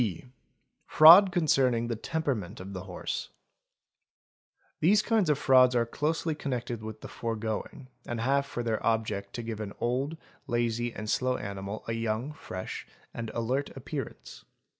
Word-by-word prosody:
(b) 105 -5 -2 0.6
Fraud 175 +5 +9
concerning 135 -8 +2
the 115 - -2
temperament 120 - -3
of 95 +2 -8
the 95 -1 -6
horse. 90 -1 -4 1.5
These 205 +6 +4
kinds 215 -7 +2
of 150 - +3
frauds 130 -3 +5
are 120 -1 +3
closely 155 +6 -1
connected 120 -5 -4
with 110 0 -8
the - - -7
foregoing 115 +3 -4 0.2
and 120 -1 -3
have 140 +4 +1
for 120 - -4
their 115 -2 -1
object 110 -3 -1
to 120 - -5
give 115 -2 -5
an 105 -2 -5
old, 135 +6 -1 0.3
lazy, 120 0 0
and 110 -1 -7
slow 125 +3 +1
animal 100 +1 -6
a 115 - -1
young, 115 +5 -2
fresh, 95 -11 -7
' - - -31
and 115 -1 -5
alert 125 +5 -1
appearance. 135 -1 -7
120 Hz, 155 wpm, -29 LUFS, 110-140 Hz, 1.5 s, Fraud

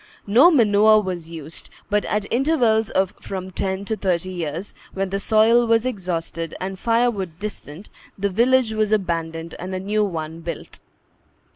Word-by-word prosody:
No 245 +12 +6
manure 215 - +5
was 180 -5 -4
used; 160 -1 -6 0.2
but, 210 0 +1
at 210 -1 -1
intervals 240 -5 +2
of 190 -1 0
from 190 -1 -6
ten 190 +1 -3
to 220 - -1
thirty 185 -3 -1
years, 170 +1 -4 0.2
when 195 -1 -2
the 195 - -1
soil 225 +3 +4
was 230 +1 +3
exhausted, 170 -7 -3
and 190 0 -5
firewood 230 -8 0
distant, 200 -3 -7 0.3
the 200 +1 0
village 240 +3 +3
was 215 -1 0
abandoned 165 -5 -1
and 185 +1 -5
a - - -2
new 210 +3 0
one 165 -4 -4
built. 170 -1 -7
195 Hz, 155 wpm, -22 LUFS, 175-220 Hz, 0.3 s, No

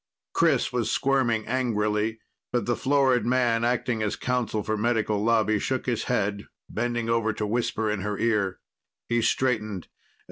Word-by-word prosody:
Chris - - +2
was - - 0
squirming 125 -5 +1
angrily, 110 -3 0 0.3
but 120 -4 0
the 120 - +1
florid 135 -2 +2
man 120 -2 +2
acting 120 -1 0
as 105 -1 -1
counsel 125 -4 -1
for 110 - -1
Medical 110 -2 0
Lobby 110 -2 +3
shook 130 +4 -2
his 120 -3 -1
head, 105 -4 -1 0.2
bending 120 0 -2
over 115 -1 +1
to 105 - -3
whisper 110 0 -1
in 105 -1 0
her 105 +1 -2
ear. 105 -5 0 0.5
He 120 0 +2
straightened. 110 -5 0
115 Hz, 150 wpm, -26 LUFS, 105-120 Hz, 0.5 s, Lobby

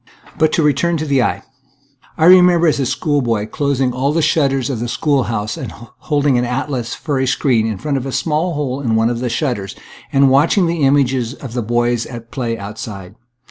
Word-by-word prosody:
But 160 -1 +2
to 165 - +2
return 150 +4 +1
to 155 - -3
the 140 -3 +2
eye. 120 - -1 0.7
I 160 - +2
remember 180 -1 +6
as 155 -3 +2
a 135 - 0
schoolboy 120 -9 0
closing 135 0 -1
all 135 +3 0
the 160 +1 0
shutters 135 -4 +1
of 125 - -3
the 120 - -3
school 140 +1 0
house 110 -2 -3
and - - -6
holding 140 +3 -1
an - - 0
atlas 125 -1 -3
for 145 -4 -2
a 130 - 0
screen 125 -4 +1
in 110 -3 -3
front 145 +5 -2
of 135 0 -4
a - - -4
small 160 +4 -1
hole 140 -2 -3
in 115 -5 0
one 115 +1 +2
of 120 - -3
the 125 0 -2
shutters, 120 - -2 0.4
and 135 -1 +4
watching 160 +7 +3
the 170 -1 -1
images 135 -3 +1
of 130 -6 -9
the 120 - -1
boys 120 +1 0
at 115 -1 -10
play 120 -4 -3
outside. 100 -2 -8
135 Hz, 210 wpm, -17 LUFS, 120-145 Hz, 0.7 s, remember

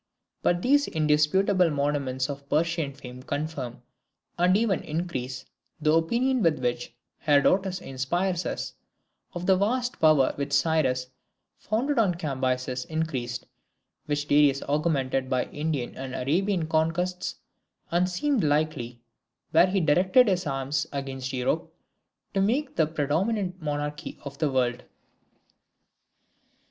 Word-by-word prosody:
But 175 0 +1
these 285 +3 +4
indisputable 160 +5 +3
monuments 140 -3 -1
of 140 -1 -7
Persian 165 -1 +1
fame 125 -1 -10
confirm, 135 -4 -4 0.5
and 180 +2 +4
even 215 -5 +1
increase, 135 -6 -4 0.3
the 155 0 +2
opinion 235 +11 +2
with 165 -5 +3
which 120 -1 -3 0.2
Herodotus 185 +6 +3
inspires 175 +7 -1
us, - - -4 0.6
of 175 0 -5
the 190 0 +5
vast 245 +6 0
power 155 -4 +5
which 140 0 -3
Cyrus 140 -4 +2 0.5
founded 240 +6 0
and 185 -6 +2
Cambyses 130 -4 -1
increased; 135 -7 -3 0.6
which 145 0 -1
Darius 145 -2 +4
augmented 135 -3 0
by 130 -1 +1
Indian 150 -5 -3
and 130 -1 -6
Arabian 175 +6 0
conquests, 170 +3 0 0.6
and 175 +2 +2
seemed 255 +6 0
likely, 145 -6 0 0.5
when 175 +3 +5
he 195 +1 +1
directed 185 - +4
his 185 -4 +1
arms 135 0 -1
against 135 -2 -4
Europe, 125 -2 -1 0.6
to 195 - +1
make 255 +8 0
the 160 - +3
predominant 180 +6 -1
monarchy 145 -1 -4
of 140 0 -8
the 155 -2 +2
world. 125 -2 0
155 Hz, 120 wpm, -26 LUFS, 135-180 Hz, 0.6 s, the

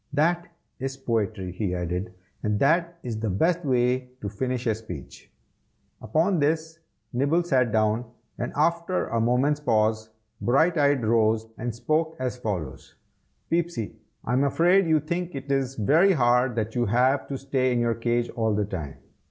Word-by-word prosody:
"That 170 +4 +1 0.3
is 135 +1 -4
poetry," 110 -7 -2
he 90 0 -2
added, 90 +2 -3 0.3
"and 105 -1 0
that 170 +4 +2
is 115 -3 -4
the 110 -1 -1
best 165 - +1
way 125 -1 +1
to 100 - -3
finish 125 +4 -3
a 115 - +2
speech." 110 +1 -10 0.7
Upon 160 - +1
this 160 +2 0 0.3
Nibble 145 +8 +2
sat 130 -8 +2
down, 110 +2 +1 0.3
and 120 - -2
after 170 +4 +1
a 115 0 0
moment's 130 +6 +2
pause, 110 -5 +1 0.3
Brighteyes 145 0 +3
rose, 110 0 +2
and 120 -1 -4
spoke 155 +6 0
as 130 -1 -2
follows: 95 - -5 0.6
"Peepsy, 165 -11 -1 0.3
I 125 - -1
am 130 +2 +3
afraid 175 +6 +3
you 160 -1 +4
think 170 +3 -3
it 135 +1 -5
is 135 -1 0
very 160 - +4
hard 125 -3 +3
that 110 -1 -2
you 120 -2 0
have 125 +6 +2
to 140 - -4
stay 130 -1 0
in 120 - +1
your 120 -1 +2
cage 120 +1 -1
all 110 -2 0
the 105 0 +1
time. 85 -8 -6
125 Hz, 160 wpm, -25 LUFS, 110-155 Hz, 0.7 s, you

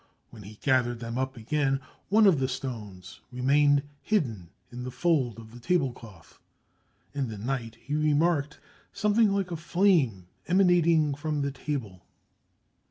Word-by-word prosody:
When 110 - -12
he 105 +2 -11
gathered 125 -4 +2
them 115 +1 -4
up 130 0 -3
again, 135 +3 0 0.3
one 215 +2 +5
of 185 -8 +5
the 130 - +1
stones 105 -9 -7
remained 140 +3 +3 0.2
hidden 115 - -1 0.2
in 125 +1 -7
a 125 - -4
fold 135 - 0
of 110 -1 -12
the 120 - -11
table 140 -1 +1
cloth. 105 -7 -15 0.7
In 140 -2 -2
the 110 -2 -7
night 115 +1 -4
he 145 - -7
remarked 150 0 +1 0.3
something 210 0 +2
like 195 -2 -1
a - - -2
flame 165 - +2 0.2
emanating 170 -5 +3
from 145 0 -2
the 140 - -1
table. 125 - -5
135 Hz, 150 wpm, -27 LUFS, 120-160 Hz, 0.7 s, one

